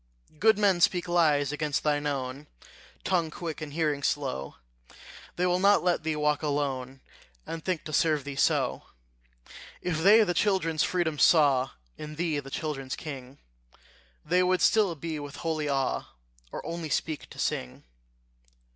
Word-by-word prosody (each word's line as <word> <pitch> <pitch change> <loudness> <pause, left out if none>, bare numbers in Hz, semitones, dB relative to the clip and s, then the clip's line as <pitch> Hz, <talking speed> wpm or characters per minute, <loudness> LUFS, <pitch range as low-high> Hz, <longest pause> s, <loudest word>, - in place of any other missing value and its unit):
Good 220 -1 +5
men 195 -4 +3
speak 175 0 +3
lies 150 -5 +2
against 150 -1 -2
thine 150 -1 +1
own 135 0 -4 0.6
Tongue 175 -4 +1
quick, 160 0 -6
and 155 -2 -6
hearing 150 -2 0
slow; 135 - -2 0.8
They 180 - 0
will 180 0 +2
not 200 0 +4
let 175 -2 +1
thee 155 0 -2
walk 150 -1 +1
alone, 135 -3 -2 0.4
And 165 -1 -6
think 180 -4 -2
to 155 - -7
serve 155 -2 +2
thee 140 0 -6
so: 135 - +1 1.0
If 170 -3 -2
they 210 +6 +7
the 180 -4 0
children's 175 -6 +1
freedom 165 -4 0
saw 135 -3 +4 0.3
In 150 0 -7
thee, 160 -2 -1
the 135 -1 -9
children's 135 -3 -4
king, 135 -3 -8 0.9
They 180 +3 +3
would 185 0 +2
be - - -1
still 205 -6 +3 0.3
with 145 -1 -8
holy 155 -3 -2
awe, 135 -1 0 0.5
Or - - -7
only 165 0 -4
speak 155 +1 -2
to - - -13
sing. 65 0 -3
155 Hz, 155 wpm, -28 LUFS, 145-175 Hz, 1.0 s, they